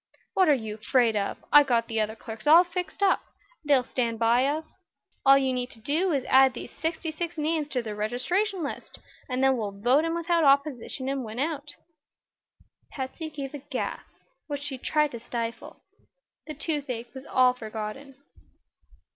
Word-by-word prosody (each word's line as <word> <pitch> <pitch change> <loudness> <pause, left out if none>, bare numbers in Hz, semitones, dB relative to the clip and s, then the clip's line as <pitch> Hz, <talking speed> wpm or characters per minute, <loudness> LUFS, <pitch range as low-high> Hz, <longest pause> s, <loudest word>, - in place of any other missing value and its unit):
"What 375 -4 +4
are 295 - +6
you 220 -4 -5
'fraid 230 0 +2
of? 200 -1 -1 0.2
I've 295 -1 +8
got 235 -2 +2
the 225 -1 0
other 215 +1 -2
clerks 225 +2 -9
all 330 +4 +9
fixed, 360 +1 -4
and 385 - +4 0.4
they'll 285 -4 +4
stand 235 -2 -2
by 235 +3 +3
us. 310 +2 -4 0.5
All 275 0 +9
you 265 -1 +1
need 250 0 -2
do 330 +9 +1
is 275 -4 0
to - - -10
add 265 -1 +6
these - - -7
sixty 320 +2 -3
six 340 +2 -5
names 310 0 0
to 255 -4 -2
the 215 -2 -5
registration 295 - -1
list, 280 - -6 0.3
and 255 +1 0
then 265 -1 +4
we'll 200 -3 -4
vote 255 +8 +4
'em 330 0 -1
without 340 0 +1
opposition 275 -2 +1
and 270 -1 -1
win 220 0 -7
out." 290 +1 -3 1.1
Patsy 275 +4 -5
gave 280 -3 -6
a 290 - -5
gasp, 275 -1 -6 0.3
which 285 -2 -4
she 275 -3 -5
tried 300 +2 +1
to 235 - -6
stifle. 230 0 -6 0.6
The 305 - -6
toothache 270 -6 -3
was 265 0 -10
all 255 -1 +4
forgotten. 225 +4 -7
270 Hz, 175 wpm, -27 LUFS, 240-305 Hz, 1.1 s, all